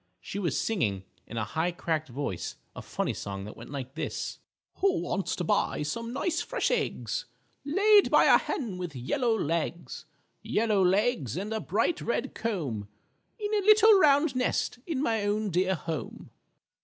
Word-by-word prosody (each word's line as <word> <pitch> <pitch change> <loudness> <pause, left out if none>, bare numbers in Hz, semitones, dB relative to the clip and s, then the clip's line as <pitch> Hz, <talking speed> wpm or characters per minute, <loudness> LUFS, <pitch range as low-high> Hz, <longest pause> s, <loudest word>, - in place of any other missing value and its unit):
She 140 - -6
was 180 -4 0
singing 105 - 0 0.2
in 115 - -7
a 110 - 0
high 160 +11 -1
cracked 160 -3 -2
voice 120 -10 -4 0.2
a - - -6
funny - - -2
song 95 0 -6
that 105 - -9
went 115 - -11
like 135 -2 -6
this: - - -4 0.4
"_Who 380 -3 +3
wants 195 - -2
to 180 - -3
buy 155 - +1
some 230 +10 -4
nice 335 +6 -1
fresh - - -1
eggs - - -1 0.4
Laid 405 +7 +5
by - - +6
a - - +7
hen 210 -10 -4
with 175 -5 -5
yellow 225 - 0
legs, 170 0 -3 0.4
Yellow 210 -3 +1
legs 190 - +1
and 205 +4 -3
a 220 - -1
bright 225 - 0
red 235 0 -2
comb, 150 - -3 0.5
In 425 -1 -3
a 420 - +3
little 430 +2 +7
round 290 -3 +4
nest 250 -1 0
in 295 -5 -1
my 225 -6 +1
own 205 0 0
dear 185 +2 +2
home? 160 -6 -6
205 Hz, 170 wpm, -28 LUFS, -, 0.5 s, a